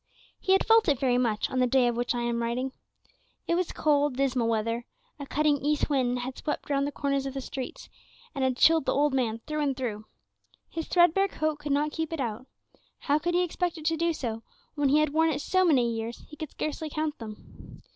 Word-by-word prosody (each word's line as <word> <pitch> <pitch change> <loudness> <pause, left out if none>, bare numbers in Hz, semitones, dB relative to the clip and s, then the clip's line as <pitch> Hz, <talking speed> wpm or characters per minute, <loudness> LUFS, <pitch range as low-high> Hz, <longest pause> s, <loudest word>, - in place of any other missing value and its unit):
He 380 - +2
had 385 - +3
felt 450 -1 +5
it 285 - +3
very 250 -2 +2
much 225 -4 +1
on 260 - 0
the 250 - +4
day 250 0 +3
of 240 - 0
which 245 +1 -1
I 240 - -1
am 235 0 -1
writing. 245 +3 -1 0.8
It - - +1
was 355 0 0
cold, 290 -3 +2
dismal 260 -4 +1
weather; 230 +2 -1 0.3
a 280 - -6
cutting 300 0 +2
east 295 +2 0
wind 250 -3 +1
had 255 +1 -4
swept 295 -1 -4
round 280 0 +1
the - - -3
corners 275 -1 -1
of 270 - -6
the - - -2
streets, 265 0 -6 0.5
and 275 -4 -2
had 260 -1 +1
chilled 320 -1 +5
the - - +2
old 290 0 +2
man 230 -4 0
through 305 0 -2
and 275 -3 0
through. 220 -5 -4 0.6
His 325 -1 -4
threadbare 355 +2 +4
coat 310 -5 -2
could 295 -1 -4
not 295 +2 +1
keep 320 0 -3
it 325 - -3
out; 240 0 -3 0.5
how 290 +1 +2
could 345 +3 -1
he 360 - +3
expect 355 0 -2
it 310 - -9
to 325 0 +2
do 335 +1 +1
so, 230 -8 -4 0.3
when 290 -2 +1
he 290 - +4
had 305 -1 +2
worn 320 +1 +3
it 285 -3 -1
so 370 +5 +2
many 255 -9 +3
years 225 +1 -5
he 300 - -11
could 305 -1 -6
scarcely 310 +1 -4
count 305 0 -3
them? 215 -2 -11
280 Hz, 230 wpm, -28 LUFS, 245-310 Hz, 0.8 s, felt